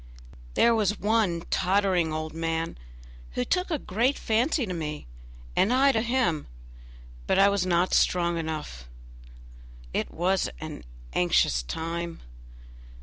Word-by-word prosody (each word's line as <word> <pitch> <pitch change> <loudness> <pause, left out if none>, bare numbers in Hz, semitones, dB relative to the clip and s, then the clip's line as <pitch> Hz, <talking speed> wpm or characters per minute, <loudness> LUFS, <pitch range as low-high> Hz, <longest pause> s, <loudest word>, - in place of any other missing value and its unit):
There 235 - +5
was 210 -2 +1
one 205 -6 +1
tottering 185 -3 +2
old 155 0 -4
man 165 0 -2 0.6
who 125 - -1
took 365 0 0
a 320 - 0
great 245 +4 0
fancy 240 +5 +1
to 185 - -4
me, 150 -3 -5 0.5
and 210 - +3
I 270 +2 +5
to 225 - +1
him, 235 - 0 0.8
but - - +2
I 195 +1 +6
was 200 -2 0
not 175 +1 +2
strong 170 -1 +2
enough 150 - -5 1.0
it - - -1
was 185 +3 0
an 155 - -8 0.3
anxious 85 -8 +3
time! 165 - -4
180 Hz, 130 wpm, -27 LUFS, 160-220 Hz, 1.0 s, I